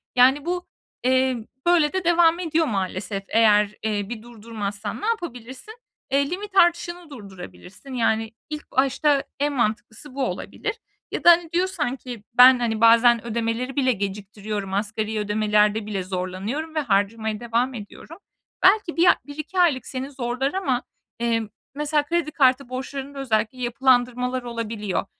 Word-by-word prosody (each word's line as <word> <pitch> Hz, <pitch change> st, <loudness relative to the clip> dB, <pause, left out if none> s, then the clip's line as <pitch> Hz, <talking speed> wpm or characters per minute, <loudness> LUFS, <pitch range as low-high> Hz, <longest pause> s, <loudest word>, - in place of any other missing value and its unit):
Yani, 265 Hz, +4 st, +5 dB
bu, 355 Hz, +1 st, -3 dB, 0.4 s
eee, 255 Hz, -2 st, +1 dB, 0.2 s
böyle 340 Hz, -4 st, +3 dB
de 375 Hz, -1 st, -1 dB
devam 340 Hz, 0 st, +4 dB
ediyor 325 Hz, -2 st, 0 dB
maalesef, 195 Hz, -1 st, -3 dB
eğer, 210 Hz, -2 st, +4 dB
eee, 210 Hz, -2 st, -2 dB
bir 235 Hz, -2 st, -6 dB
durdurmazsan. 215 Hz, -3 st, -6 dB
Ne -, -, -3 dB
yapabilirsin? 340 Hz, -, -5 dB, 0.4 s
Eee, 280 Hz, +1 st, +2 dB
limit 390 Hz, +3 st, -6 dB
artışını 345 Hz, -1 st, +2 dB
durdurabilirsin. 200 Hz, +1 st, -11 dB
Yani, 225 Hz, -2 st, 0 dB, 0.2 s
ilk 300 Hz, 0 st, -7 dB
başta 275 Hz, +2 st, +2 dB, 0.2 s
en 290 Hz, +1 st, 0 dB
mantıklısı 235 Hz, +2 st, -3 dB
bu 275 Hz, -1 st, 0 dB
olabilir. 420 Hz, +10 st, -4 dB, 0.4 s
Ya -, -, -4 dB
da, -, -, +8 dB
hani, 335 Hz, -1 st, +2 dB
diyorsan 340 Hz, -7 st, -1 dB
ki 245 Hz, -4 st, -9 dB
ben, 250 Hz, +1 st, +8 dB
hani, 225 Hz, -2 st, -1 dB
bazen 230 Hz, 0 st, +5 dB
ödemeleri 235 Hz, +3 st, -2 dB
bile 260 Hz, -3 st, +2 dB
geciktiriyorum, 200 Hz, -1 st, -5 dB
asgari 215 Hz, +2 st, -2 dB
ödemelerde 210 Hz, 0 st, +1 dB
bile 200 Hz, -3 st, -3 dB
zorlanıyorum 190 Hz, -, -4 dB
ve -, -, +2 dB
harcamaya 220 Hz, -3 st, 0 dB
devam 240 Hz, +2 st, -1 dB
ediyorum. 240 Hz, +8 st, -10 dB, 0.5 s
Belki 375 Hz, -3 st, +4 dB
bir 340 Hz, -, +4 dB
a -, -, +7 dB
1-2 305 Hz, +6 st, -5 dB
aylık 310 Hz, -8 st, +3 dB
seni 265 Hz, +1 st, -5 dB
zorlar 260 Hz, +1 st, -2 dB
ama, 270 Hz, -11 st, -1 dB, 0.4 s
eee, 235 Hz, -1 st, +1 dB, 0.3 s
mesela, 295 Hz, 0 st, 0 dB
kredi 335 Hz, 0 st, -1 dB
kartı 260 Hz, -2 st, +2 dB
borçlarında 275 Hz, +2 st, -6 dB
özellikle 225 Hz, -2 st, -1 dB
yapılandırmalar 250 Hz, 0 st, +1 dB
olabiliyor 225 Hz, -5 st, -3 dB
250 Hz, 145 wpm, -23 LUFS, 215-295 Hz, 0.5 s, da